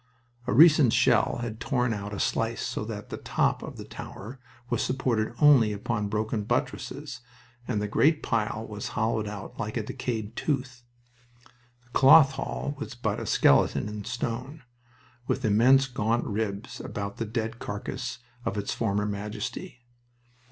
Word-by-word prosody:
A - - +1
recent 145 -1 +7
shell 120 -4 +3
had 110 -2 -5
torn 125 -1 0
out 100 -1 -5
a 100 - -5
slice - - 0
so - - -3
that - - -7
the - - -5
top - - 0
of - - -8
the - - -8
tower 120 +7 -9 0.3
was 120 -2 0
supported 120 -4 0
only 140 -8 +6
upon 105 0 -2
broken 110 0 -1
buttresses, - - -3 0.5
and 110 -4 0
the 105 - -1
great 150 +9 +3
pile 110 -1 -1
was 105 -1 -5
hollowed 110 -1 0
out 105 -1 -8
like 110 +1 -3
a 115 - -1
decayed 110 0 -4
tooth. 125 -4 -2 1.0
The 120 - -28
Cloth 135 +2 +7
Hall 140 +1 -4
was 145 -3 -6
but 120 - -2
a - - -5
skeleton - - +3
in 105 0 -6
stone, 120 +6 -4 0.6
with 130 - -1
immense 125 +6 +5
gaunt 115 -1 0
ribs 105 -1 -3
about 100 -1 -5
the 115 - -2
dead 115 +1 -3
carcass 125 +6 -5 0.3
of 100 - -2
its 100 - -2
former 105 -2 0
majesty. 105 +3 -5
115 Hz, 155 wpm, -27 LUFS, 105-125 Hz, 1.0 s, recent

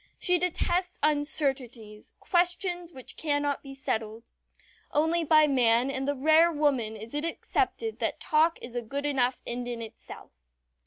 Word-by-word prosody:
She 360 -1 +2
detests 360 +1 0
uncertainties 270 -7 -1
questions 355 -1 0
which 260 -5 -6
cannot 290 -2 -1
be 275 -1 -10
settled. 225 -3 -4 0.6
Only 320 +3 +2
by 310 -1 +5
man 250 -2 +3
and 270 0 -3
the 285 - 0
rare 315 +5 +5
woman 275 -8 0
is 220 +2 -10
it 295 +1 -2
accepted 410 +6 -2
that - - -2
talk 315 +2 +2
is 240 0 -7
a 245 - -1
good 280 +5 -5
enough 260 -3 0
end 245 +1 -4
in 240 -1 -4
itself. 225 -1 -10
285 Hz, 150 wpm, -28 LUFS, 245-325 Hz, 0.6 s, by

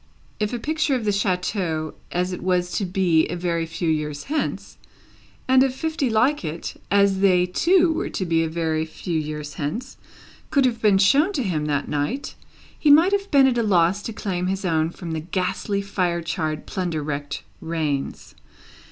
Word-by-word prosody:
If 210 -1 0
a 245 - -2
picture 310 +3 0
of 240 -4 -2
the 205 - +2
chateau 180 -5 -1 0.2
as 180 +1 -1
it - - -6
was 180 -1 0
to 200 - -1
be 180 -3 +2
a 175 - -4
very 170 -2 -1
few 170 +1 -3
years 150 -2 -1
hence, 305 +2 -3 0.7
and 260 0 +5
of 265 -1 +2
fifty 315 -2 -1
like 250 +6 +2
it 160 +1 -5 0.2
as 200 -1 +3
they 185 -2 +4
too 340 - +3
were - - -2
to 185 - -3
be 165 -1 +2
a 160 - -2
very 160 -1 -1
few 160 +1 -3
years 150 -1 -5
hence, 190 - -4 0.5
could 275 -2 +3
have 235 -3 0
been 205 -3 +5
shown 280 - +4
to 275 - -1
him 160 -7 -1
that 145 -1 -1
night, 150 - -2 0.5
he 300 - +3
might 325 +6 +7
have 400 0 0
been 280 -5 +6
at 250 -2 +2
a - - +3
loss 190 -2 +3
to 225 - -5
claim 185 -4 -3
his 195 +1 -2
own 160 -2 +1
from 170 0 -7
the 160 - -2
ghastly, 190 +4 -2
fire 180 -4 -1
charred, 155 -2 -3
plunder 175 -6 -3
wrecked 145 -1 -4 0.2
rains. 155 -4 -3
180 Hz, 185 wpm, -23 LUFS, 160-230 Hz, 0.7 s, might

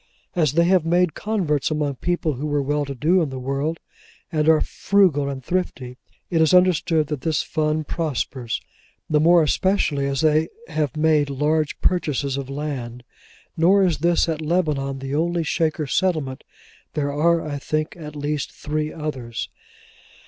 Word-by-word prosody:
As 155 -6 +2
they 170 +2 +4
have 180 -1 +3
made 175 0 +2
converts 175 -11 -1
among 150 -3 -1
people 175 -1 -1
who 140 +4 -4
were 145 -1 0
well 145 +1 0
to 140 0 -6
do 170 +9 +3
in 155 - -1
the 130 - -6
world, 140 +5 -2 0.5
and 155 -1 +2
are 160 -1 +6
frugal 180 -8 +2
and 135 -2 -6
thrifty, 135 -9 -2 0.4
it 165 -2 +3
is 160 +3 +5
understood 170 -3 +3
that 150 -3 -4
this 160 -2 0
fund 155 0 -1
prospers: 130 -7 -2 0.5
the 150 - +2
more 170 +2 +5
especially 150 -4 +1
as 135 -1 -1
they 155 0 +3 0.2
have 150 -4 -2
made 155 -2 +3
large 150 +2 0
purchases 145 -6 0
of 135 -1 -5
land. 135 -4 -5 0.5
Nor 185 +4 +4
is 175 -4 +1
this 170 +2 +2
at 160 -1 -2
Lebanon 150 -5 0
the 135 +1 -5
only 170 +2 0
Shaker 155 -1 0
settlement: 145 -3 -1 0.5
there 145 -1 -1
are, 165 +2 +2
I 145 -1 -4
think, 155 +2 -2
at 150 -3 -9
least, 145 0 -3
three 155 +1 -3
others. 130 -7 -5
155 Hz, 165 wpm, -22 LUFS, 140-165 Hz, 0.5 s, are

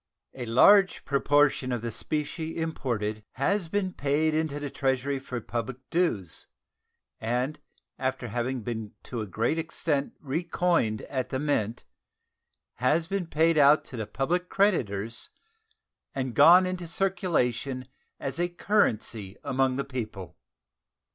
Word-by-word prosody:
A 125 -3 -6
large 190 - +5
proportion 140 -1 +2
of 120 -2 -2
the 115 - -2
specie 155 - -3
imported 115 -10 -2
has 180 +7 0
been 190 0 -1
paid 150 +3 +1
into 155 -2 -1
the 145 -2 -5
Treasury 135 0 0
for 130 -2 -5
public 120 +2 -4
dues, 135 - -1 0.7
and 125 +6 -1 0.4
after 130 -2 -2
having 120 +2 -2
been 110 -2 -5
to 120 -3 -5
a 105 - -4
great 115 - 0
extent 155 -3 -1
recoined 160 -6 0
at 130 -2 -3
the 130 - -1
Mint 125 -6 -1 0.9
has 150 +7 +2
been 190 0 -2
paid 160 0 +3
out 145 +2 +6
to - - -9
the 110 -3 -4
public 170 +11 -1
creditors 115 - 0 0.9
and 130 -2 -2
gone 170 +7 +8
into 185 -1 -4
circulation 150 - 0 0.3
as 135 +4 -4
a 175 0 +1
currency 115 - 0
among 130 0 +1
the 140 - -2
people. 110 -10 -6
140 Hz, 130 wpm, -27 LUFS, 120-165 Hz, 0.9 s, gone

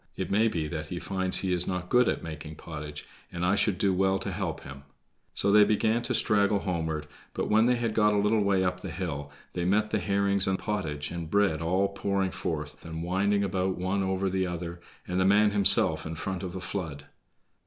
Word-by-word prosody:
It - - -3
may 110 +3 +3
be 85 -8 -2
that 75 -1 -5
he 90 - -5
finds 95 0 0
he 95 -2 0
is 90 0 0
not 90 -1 -3
good 125 0 +5
at - - -2
making 80 -1 -7
pottage, 75 -2 -8 0.3
and 85 0 -2
I 90 - +3
should 100 -1 +2
do 100 -2 +2
well 95 +1 +2
to - - -4
help - - -3
him." 70 0 -10 0.5
So 100 - +1
they 105 0 +7
began 110 +2 +2
to - - -1
straggle 105 -1 +3
homeward, 80 -4 -2 0.3
but - - -2
when 110 +2 +5
they 125 - +3
had 115 -2 -2
got 105 -1 +3
a 105 - +1
little 105 +2 +2
way 100 -2 +2
up 90 -1 -1
the 95 - -7
hill 80 -5 -5 0.2
they 90 - -2
met 105 +4 +1
the 110 - +1
herrings 100 +1 +1
and 95 0 +1
pottage 80 -10 -3
and 85 -2 -5
bread, 100 -4 +2
all 90 +4 +1
pouring 100 -1 -1
forth 75 -3 -5
and 80 0 -6
winding 100 +3 +1
about 95 -1 -1
one 95 +2 -1
over 95 0 -1
the 95 0 0
other, 85 0 -6 0.3
and 90 +1 -1
the - - +3
man 105 +2 +4
himself 95 -6 +5
in 80 +1 -5
front 95 +2 -4
of 90 -2 -5
the 95 - -6
flood. 80 -6 -5
95 Hz, 220 wpm, -28 LUFS, 85-100 Hz, 0.5 s, they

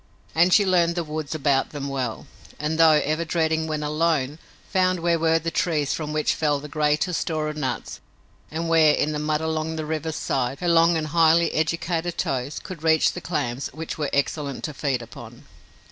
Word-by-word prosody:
And 175 +3 +4
she 205 +2 +5
learned 170 -2 +2
the 170 - -1
woods 155 -1 -5
about 140 -3 +1
them 145 -2 -5
well, 130 -5 -3 0.3
and, 155 +2 -2
though 160 -2 +6
ever 155 +3 0
dreading 160 -1 0
when 155 -1 -2
alone, 150 -1 0 0.3
found 185 -2 +1
where 170 -1 +2
were 165 0 +3
the 165 0 -3
trees 150 -5 0
from 150 -2 -4
which 155 0 +1
fell 150 -2 0
the 150 - -8
greatest 150 +3 0
store 155 -2 -2
of 150 - -5
nuts 150 -4 -4 0.5
and 165 +2 -3
where, 160 -2 +5
in 150 - 0
the 150 - -3
mud 150 0 0
along 160 0 -2
the 155 -1 -4
river's 160 0 -3
side, 135 -1 -2
her 175 - -2
long 170 0 +4
and 155 -1 -3
highly 165 +1 +4
educated 165 +2 -1
toes 135 +2 -2
could 180 -5 -8
reach 160 -1 +3
the 180 - -6
clams 140 -7 -2
which 160 +1 -6
were 145 -2 -1
excellent 140 0 -1
to 150 - -4
feed 135 -3 -2
upon. 115 - -12
155 Hz, 195 wpm, -24 LUFS, 150-165 Hz, 0.5 s, though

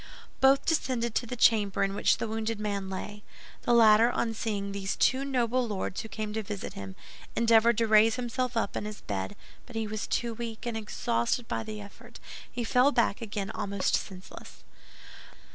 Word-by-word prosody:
Both 270 +1 +5
descended 255 -7 0
to 240 - -1
the 250 - -4
chamber 210 -5 +3
in 195 0 0
which - - +2
the 230 - -3
wounded 220 0 -2
man 200 -2 -2
lay. 205 +2 -6 0.4
The - - 0
latter, 225 0 +7
on 235 -2 -1
seeing 205 -3 -3
these 195 0 -3
two 265 +1 +2
noble 255 -2 0
lords 195 -3 -3
who - - -8
came 215 -1 -4
to 220 - -1
visit 205 -1 -6
him, 95 -1 -8 0.4
endeavored 230 0 +4
to 230 - +3
raise 220 +1 +5
himself 250 0 -2
up 215 - -1
in - - -3
his 210 -1 -7
bed; 95 -1 -4 0.3
but 245 - -12
he 225 0 -1
was 215 0 -4
too 235 -1 -1
weak, 230 0 -6
and 235 -1 -2
exhausted 210 - -1
by - - -2
the 215 -1 -6
effort, 200 -1 -12 0.3
he 240 - -3
fell 250 +4 +4
back 235 -5 +1
again 205 -2 -4
almost 200 -3 -2
senseless. 185 -1 -5
220 Hz, 185 wpm, -29 LUFS, 205-235 Hz, 0.4 s, latter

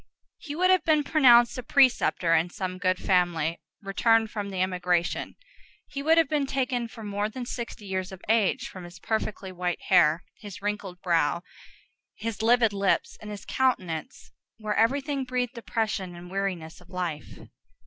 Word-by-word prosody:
He 290 -3 -7
would 365 +3 +3
have 370 -3 +4
been 310 -2 +3
pronounced 250 -5 +5
a - - -2
preceptor 245 -10 +3
in 165 +2 +3
some 185 0 -5
good 185 -1 +1
family, 175 -4 +1 0.2
returned 225 +2 +2
from 205 -2 -4
the 190 -2 -5
emigration. 180 -2 -1 0.5
He 280 - -6
would 320 +3 +4
have 330 -3 +5
been 290 -1 0
taken 255 -3 -1
for 225 0 -11
more 205 0 -2
than 245 +3 -6
sixty 235 -3 -6
years 190 -1 -3
of 190 - -9
age, 220 -3 +2
from 185 - -10
his 175 +1 -11
perfectly 210 -1 -3
white 180 -1 -2
hair, 170 -2 +5 0.2
his 205 -4 -9
wrinkled 200 -3 -4
brow, 170 -1 +1 0.7
his 220 -1 -4
livid 230 -1 +4
lips, 200 -1 0
and 215 - -8
his 205 -1 -8
countenance, 200 -8 -2 0.3
where 215 -1 -2
everything 275 +4 +1
breathed 250 -1 -2
depression 220 -6 -3
and 175 +1 -11
weariness 180 -4 -3
of 180 - -19
life. 180 -5 -5
205 Hz, 165 wpm, -27 LUFS, 180-245 Hz, 0.7 s, pronounced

